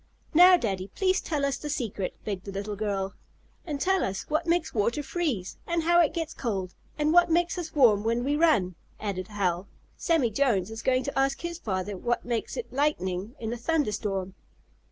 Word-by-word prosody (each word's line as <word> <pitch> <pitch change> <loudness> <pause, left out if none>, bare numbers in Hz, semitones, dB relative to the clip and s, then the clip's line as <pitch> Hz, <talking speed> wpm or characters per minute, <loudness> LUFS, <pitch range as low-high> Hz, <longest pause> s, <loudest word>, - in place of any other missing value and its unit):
"Now, 360 +3 +8
Daddy, 195 - -3
please 375 -1 +2
tell 295 -4 -1
us 275 -1 0
the 300 - -6
secret," 220 -9 -3
begged 195 -3 -4
the 200 - -6
little 200 +2 -4
girl. 195 -2 -2 0.5
"And 290 -3 -3
tell 380 +4 +2
us 190 0 -2
what 310 +3 -1
makes 340 -1 +1
water 235 +7 0
freeze, 275 - -2
and 340 -1 0
how 345 +1 +5
it 320 - +3
gets 325 -2 -3
cold, 190 -7 -3 0.2
and 300 +1 +2
what 350 0 +6
makes 345 +1 +2
us 335 -2 -6
warm 225 -8 +5
when 230 +2 0
we 285 +3 +1
run," 295 - +3 0.3
added 185 -3 -3
Hal. 190 -3 -1 0.3
"Sammie 315 -9 +2
Jones 220 -5 +1
is 225 0 -6
going 255 +1 +2
to 280 -1 -2
ask 270 0 +1
his 340 0 -4
father 195 - -3
what 240 +6 -1
makes 235 -2 -2
it 485 - -6
lightning 215 -7 -1
in 225 0 -3
a - - -4
thunder 295 0 0
storm." 195 -3 -3
240 Hz, 195 wpm, -27 LUFS, 200-315 Hz, 0.5 s, Now